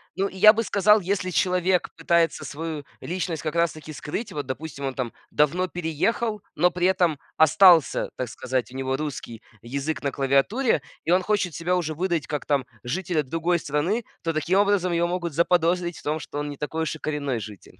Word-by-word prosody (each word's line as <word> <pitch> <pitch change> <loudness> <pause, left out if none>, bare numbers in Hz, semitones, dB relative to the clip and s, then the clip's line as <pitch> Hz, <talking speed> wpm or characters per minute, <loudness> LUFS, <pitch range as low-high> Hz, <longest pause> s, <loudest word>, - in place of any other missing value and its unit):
Ну, 195 - 0
я 205 +3 +7
бы 230 - 0
сказал, 210 0 +4
если 185 0 -1
человек 180 0 +1
пытается 165 0 +1
свою 155 0 -5 0.2
личность 175 -2 -3
как 155 - -4
раз-таки 155 -2 -1
скрыть. 175 - -5
Вот, 145 -2 -4
допустим, 140 +1 -5
он 135 - -2
там 125 -3 -4 0.2
давно 170 +5 +2
переехал, 180 +7 -1
но 180 +4 +3
при 180 +1 +1
этом 175 -6 +2 0.2
остался, 165 0 +5
так 130 - -2
сказать, 130 +1 -3
у - - -12
него 135 0 -1
русский 135 -6 -6 0.2
язык 140 +6 -3
на 140 - 0
клавиатуре, 140 - +2 0.2
и - - +1
он 180 +1 +5
хочет 185 -4 0
себя 175 +2 0
уже 160 -3 -2
выдать 170 -1 -1
как, 150 -2 -3
там, 140 -3 +1 0.2
жителя 160 +4 -1
другой 165 +5 0
страны, 165 +11 -1 0.2
то 165 - -1
таким 175 +5 +1
образом 200 -3 +2
его 170 0 +1
могут 175 -2 -3
заподозрить 175 +1 +2
в - - -16
том, 155 +2 -1
что 145 - -6
он 145 0 -3
не 145 - -7
такой 160 +2 -3
уж 160 0 -2
и - - -11
коренной 145 -5 -2
житель. 105 -3 -11
165 Hz, 190 wpm, -25 LUFS, 145-180 Hz, 0.2 s, я